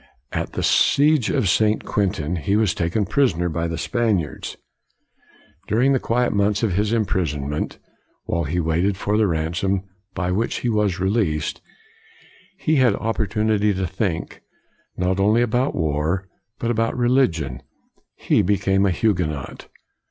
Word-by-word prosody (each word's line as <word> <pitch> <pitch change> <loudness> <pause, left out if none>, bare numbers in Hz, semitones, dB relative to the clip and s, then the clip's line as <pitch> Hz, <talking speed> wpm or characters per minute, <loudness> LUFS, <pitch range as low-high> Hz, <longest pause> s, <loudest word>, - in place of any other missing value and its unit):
At - - -3
the - - -3
siege 145 -4 +3
of 100 - +1
St. 105 +3 +2
Quentin, 90 -5 -1
he 85 +6 0
was 105 -3 +2
taken 90 +5 -1
prisoner 90 -8 +1
by 85 +1 -2
the 80 -1 -4
Spaniards. 100 - -1 1.1
During 125 +6 +3
the 130 - +2
quiet 120 +1 0
months 100 +1 +1
of 105 -5 +1
his 105 +3 0
imprisonment, 75 - -1 0.5
while 85 -1 -1
he 80 +5 -1
waited 85 +4 0
for 105 +1 -1
the 110 -1 +3
ransom 85 +4 -1 0.3
by 90 -1 -1
which 110 +6 -1
he 120 - 0
was 105 -5 +1
released, 95 -6 0 1.0
he 155 -1 +1
had 125 -6 +4
opportunity 105 -1 0
to 95 0 -1
think, 90 -2 -3 0.6
not 90 +1 0
only 105 +4 +4
about 120 +4 0
war, 80 +4 -1 0.3
but 120 - -1
about 115 +1 0
religion. 85 - +1 0.5
He - - +2
became 95 0 +2
a - - +2
Huguenot. 85 - -2
100 Hz, 140 wpm, -22 LUFS, 85-110 Hz, 1.1 s, had